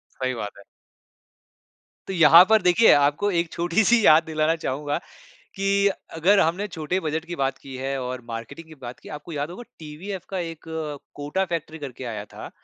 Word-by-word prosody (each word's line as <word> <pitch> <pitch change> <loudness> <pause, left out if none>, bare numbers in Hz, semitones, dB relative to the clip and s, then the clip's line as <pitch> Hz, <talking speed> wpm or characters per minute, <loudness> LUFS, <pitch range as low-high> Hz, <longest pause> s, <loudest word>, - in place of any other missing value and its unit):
सही 130 -1 -2
बात 105 -3 -6
है। 100 - -14 1.4
तो 195 - -4
यहाँ 170 0 +8
पर 220 -2 +5
देखिए 180 +5 +5
आपको 145 +8 +2
एक 170 -1 0
छोटी 175 +5 +1
सी 225 +1 +4
याद 155 +1 +7
दिलाना 160 0 0
चाहूँगा 145 -1 -3 0.6
कि 200 +1 +2 0.3
अगर 185 +6 +4
हमने 175 +6 +1
छोटे 175 0 -2
बजट 160 0 -2
की 175 0 -6
बात 135 -1 -1
की 135 -1 -10
है 135 +1 -3
और 125 0 -4
मार्केटिंग 115 +8 -7
की 155 - -12
बात 120 0 -8
की - - -13
है - - -7
आपको 150 +3 -9
याद 145 +1 -3
होगा 185 +8 -8 0.2
टीवीएफ 165 +5 -7
का 190 - -3
एक 165 -2 -6 0.5
कोटा 145 +7 -2
फैक्ट्री 160 -1 -4
करके 135 -3 -8
आया 110 -4 -5
था। - - -8
160 Hz, 190 wpm, -24 LUFS, 140-180 Hz, 1.4 s, यहाँ